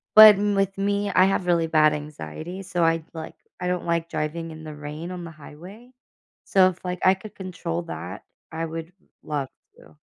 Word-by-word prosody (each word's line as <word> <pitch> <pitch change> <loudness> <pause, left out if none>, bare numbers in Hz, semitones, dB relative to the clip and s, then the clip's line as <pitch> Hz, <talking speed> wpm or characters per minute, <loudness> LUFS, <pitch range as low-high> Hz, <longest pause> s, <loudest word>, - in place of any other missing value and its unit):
but 215 -1 +12
m 205 +1 0
with 195 0 0
me, 200 +1 0
I 185 0 +5
have 190 -1 +1
really 170 -2 +2
bad 155 -1 +4
anxiety, 150 - -7
so, 180 -2 -1
I'd 165 -1 +2
like, 160 -1 -7 0.3
I 180 - -1
don't 180 -1 -1
like 170 -1 0
driving 165 +2 -3
in 155 0 -10
the 155 -1 -8
rain 150 +4 -7
on 180 -1 -6
the 165 - -8
highway. 180 - -13 0.5
So, 190 -1 +5
if 180 -1 -10
like 180 0 -3
I 185 - +7
could 200 +3 -12
control 175 -2 -4
that, 170 - -7 0.3
I 165 0 -3
would 165 +1 -6 0.3
love 145 -3 -2 0.3
to. - - -18
170 Hz, 195 wpm, -24 LUFS, 160-190 Hz, 0.5 s, but